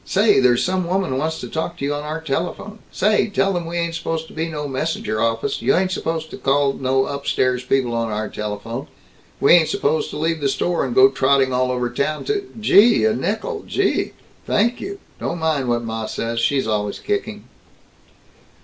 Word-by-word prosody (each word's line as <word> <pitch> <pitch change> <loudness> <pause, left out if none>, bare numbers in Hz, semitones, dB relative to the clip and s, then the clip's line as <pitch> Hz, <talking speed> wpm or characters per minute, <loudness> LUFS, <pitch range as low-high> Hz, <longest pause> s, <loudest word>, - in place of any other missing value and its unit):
Say, 205 -1 +3
there's 125 -2 +4
some 185 -1 0
woman 185 -6 0
wants 160 +2 -2
to - - -5
talk 165 +2 -4
to 140 - -3
you 145 - 0
on 145 - -3
our 155 +2 -4
telephone. 175 +8 -3
Say, 210 +2 +2
tell 195 -1 +1
them 175 -2 -3
we 170 +1 -4
ain't 170 -1 -1
supposed 165 -1 -3
to - - -13
be 160 +1 -2
no 150 -2 -4
messenger 130 -6 -2
office. 115 0 0
You 205 - +3
ain't 185 0 +1
supposed 160 -3 -3
to - - -7
call 140 0 +2
no 135 0 +1
upstairs 130 -3 0
people 125 -1 +1
on 115 -1 -1
our 105 +1 -2
telephone. 105 +5 -5 0.5
We 140 - +5
ain't 170 -3 +5
supposed 160 -6 0
to - - -6
leave 160 +1 -1
the 140 - +1
store 175 +5 0
and 125 -2 -3
go 130 +1 +8
trotting 135 -1 +2
all 125 0 +1
over 125 -1 0
town 140 +5 -2
to 405 -2 -2
Gee, 210 - +5
a 110 - +3
nickel, 415 - -2
gee, - - 0 0.3
thank 235 +4 +1
you, 400 +1 -5 0.2
don't 170 - -3
mind 155 -6 0
what 120 0 0
ma 110 -1 -4
says, 115 +1 -3
she's 135 +3 +1
always 105 -2 -1
kicking." 410 0 -3
145 Hz, 200 wpm, -21 LUFS, 125-175 Hz, 0.5 s, go